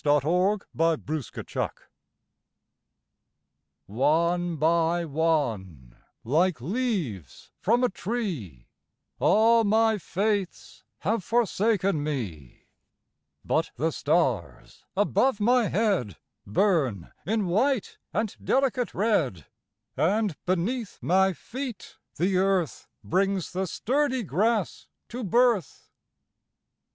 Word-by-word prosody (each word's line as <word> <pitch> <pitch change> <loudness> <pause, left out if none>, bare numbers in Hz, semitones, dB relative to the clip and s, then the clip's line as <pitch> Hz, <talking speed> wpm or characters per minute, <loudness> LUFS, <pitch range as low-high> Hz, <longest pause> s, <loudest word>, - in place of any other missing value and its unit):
Leaves 175 +8 +2
By 165 +1 +2
Sara 155 -3 -5
Teasdale - - -2 2.2
ONE 170 - +1
by 165 +2 +2
one, 115 - -1 0.3
like 160 +4 +1
leaves 165 - -3
from 235 +5 +2
a 250 - +3
tree, 175 - -4 0.5
All 230 +2 +4
my 220 +1 +3
faiths 200 0 -2 0.2
have 205 +3 0
forsaken 205 -7 +1
me; 100 - -5 0.8
But - - +1
the 160 +6 0
stars 135 - -1
above 210 +3 +2
my 235 0 +3
headBurn 150 - -1 0.2
in 215 0 +1
white 220 +7 0
and 215 0 -2
delicate 260 -3 +1
red, 160 - 0 0.5
And 200 +1 +1
beneath 200 +6 -1
my 190 +2 +3
feet 250 - -7 0.2
the 185 +3 0
earthBrings 190 0 -1
the 190 +1 -2
sturdy 260 - 0
grass 210 - 0 0.2
to 245 +1 -5
birth. 235 -1 +1
185 Hz, 90 wpm, -26 LUFS, 155-220 Hz, 2.2 s, All